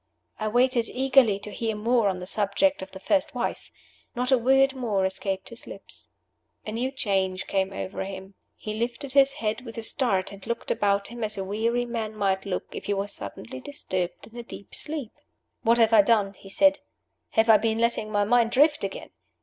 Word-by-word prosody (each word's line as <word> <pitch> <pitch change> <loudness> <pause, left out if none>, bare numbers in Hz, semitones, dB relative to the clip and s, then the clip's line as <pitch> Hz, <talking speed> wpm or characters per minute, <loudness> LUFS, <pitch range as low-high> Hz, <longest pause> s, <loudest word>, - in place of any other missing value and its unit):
I 215 - -1
waited 245 +1 +2
eagerly 260 -5 +4
to 210 +1 -9
hear 220 +2 -2
more 225 0 +2
on 185 -1 -3
the 180 - -6
subject 210 +9 +1
of 190 - -7
the 190 - -10
first 290 +6 0
wife. 240 - -3 0.5
Not 250 +2 -1
a 260 - +6
word 270 +2 +4
more 220 -7 0
escaped 190 0 -3
his 235 - -12
lips. - - -12 0.6
A 215 - -4
new 240 +4 -1
change 190 -7 -1
came 190 0 0
over 190 0 -4
him. 190 0 -8 0.2
He 215 - -5
lifted 240 +4 -3
his 275 0 +5
head 220 -4 -2
with 230 -2 -9
a 230 - -4
start, 200 -6 +1
and 200 +1 -11
looked 235 - -3
about 200 -1 +1
him 235 0 -6
as 215 -1 -1
a 195 - -2
weary 230 +5 0
man 225 -2 -4
might 195 -1 0
look 190 - -2
if - - -7
he 205 - 0
was 200 +1 -2
suddenly 110 +5 -8
disturbed 185 - -4
in 225 +2 -17
a 240 - -5
deep 230 -3 -11
sleep. 295 -7 -4 0.5
"What 230 +1 +3
have 225 -1 +4
I 215 - +9
done?" 200 -2 +2
he 195 - -14
said. 290 +8 +4 0.5
"Have 220 +1 +3
I 220 -1 +8
been 220 +1 0
letting 230 -2 0
my 205 -1 +2
mind 230 +2 +3
drift 295 +3 +3
again?" 195 -1 -5
220 Hz, 205 wpm, -26 LUFS, 195-245 Hz, 0.6 s, I